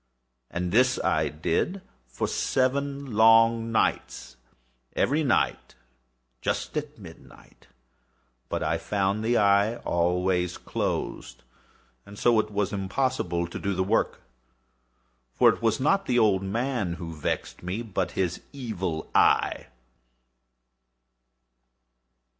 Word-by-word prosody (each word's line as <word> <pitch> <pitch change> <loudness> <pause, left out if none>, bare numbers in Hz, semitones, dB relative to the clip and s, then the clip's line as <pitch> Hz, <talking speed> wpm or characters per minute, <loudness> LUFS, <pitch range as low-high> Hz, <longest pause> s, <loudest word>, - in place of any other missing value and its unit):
And 90 0 -3
this 125 +4 +3
I - - +1
did 80 - -1 0.3
for 65 - -3
seven 140 0 -1
long 115 +1 +5
nights—every 65 - -2
night 135 - 0 0.7
just - - -2
at - - -4
midnight—but - - -12
I - - 0
found 100 +1 -1
the 120 +2 +2
eye 100 +2 +3
always 90 -2 0
closed; 65 -1 -4 0.6
and 100 0 -13
so 120 0 +3
it - - -1
was 105 -1 -1
impossible 95 -3 -1
to 85 - -7
do 100 -1 -2
the 95 - +1
work; 105 +4 0 1.1
for - - +6
it - - -1
was 110 -1 +1
not 195 +9 +1
the 125 - +1
old 105 -5 +3
man 110 -1 -2
who 85 -1 -7
vexed 75 - -3
me, 95 +6 -4
but 110 -5 -3
his 90 -2 -1
Evil 100 - -4
Eye. - - +3
100 Hz, 110 wpm, -26 LUFS, 85-120 Hz, 1.1 s, for